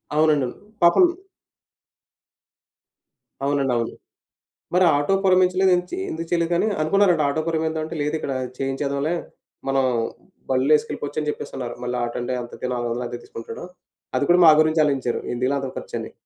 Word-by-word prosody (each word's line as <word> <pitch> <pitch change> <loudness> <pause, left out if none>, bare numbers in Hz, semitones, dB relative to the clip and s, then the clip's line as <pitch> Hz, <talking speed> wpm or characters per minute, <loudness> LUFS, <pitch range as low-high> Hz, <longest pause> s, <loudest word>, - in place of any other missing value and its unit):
అవునండి. 150 -4 +3 0.3
పాపం 170 - +6 2.4
అవునండి. 140 -3 +1
అవును. 115 -1 -2 0.8
మరి 180 +1 +5
ఆటో 145 +7 +1
పురమాయించలేదు, 185 0 +4
ఎ - - +1 0.3
ఎందుకు 165 +1 -4
చేయలేదని 170 +2 +1
అనుకున్నారంట. 175 +1 +3
ఆటో 155 +3 0
పురమాయిద్దాం 160 -1 -1
అంటే 165 +1 -6
లేదిక్కడ 150 -1 -2 0.3
చేయించేద్దాంలే. 140 +3 -1 0.5
మనం 135 0 +2 0.7
బండ్లేసుకెళ్ళిపోవచ్చని 145 +2 +1
చెప్పేసన్నారు. 130 -4 -6
మళ్ళా 125 0 -2
ఆటో 120 - -4
అంటే 125 +1 -3
ఎంతకి 125 +1 -6
నాలుగొందలెంతో 120 0 -3
తీసుకుంటాడు. 115 0 -8 0.5
అది - - +1
కూడా 175 +1 +5
మా - - +10
గురించే 155 0 +1
ఆలోచించారు, 135 -4 -1
ఎందుకులే 130 +3 0
అంత 135 -1 -4
ఖర్చని. - - -6
150 Hz, 120 wpm, -23 LUFS, 130-165 Hz, 2.4 s, మా